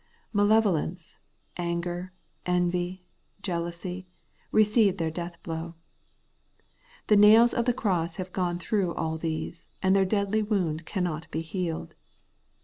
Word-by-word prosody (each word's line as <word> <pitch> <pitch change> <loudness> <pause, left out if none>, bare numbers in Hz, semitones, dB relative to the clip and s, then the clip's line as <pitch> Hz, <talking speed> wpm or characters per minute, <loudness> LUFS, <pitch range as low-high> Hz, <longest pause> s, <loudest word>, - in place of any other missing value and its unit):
Malevolence, 205 -5 +2 0.4
anger, 175 +1 -3 0.4
envy, 180 +1 0 0.4
jealousy, 180 +1 -4 0.4
receive 210 -2 +4
their 165 -2 -1
death 170 +1 -6
blow. 165 0 -5 1.3
The 210 - +4
nails 220 +3 +7
of 235 - +1
the 250 - +4
cross 175 -7 0
have 185 -1 -6
gone 175 -2 0
through 180 0 -1
all 160 0 -2
these, 160 +1 -4
and 190 +1 +4
their 195 - +5
deadly 200 +2 +1
wound 175 -7 -1
cannot 170 -5 -2
be 160 - -2
healed. 165 - -4
180 Hz, 120 wpm, -27 LUFS, 170-200 Hz, 1.3 s, nails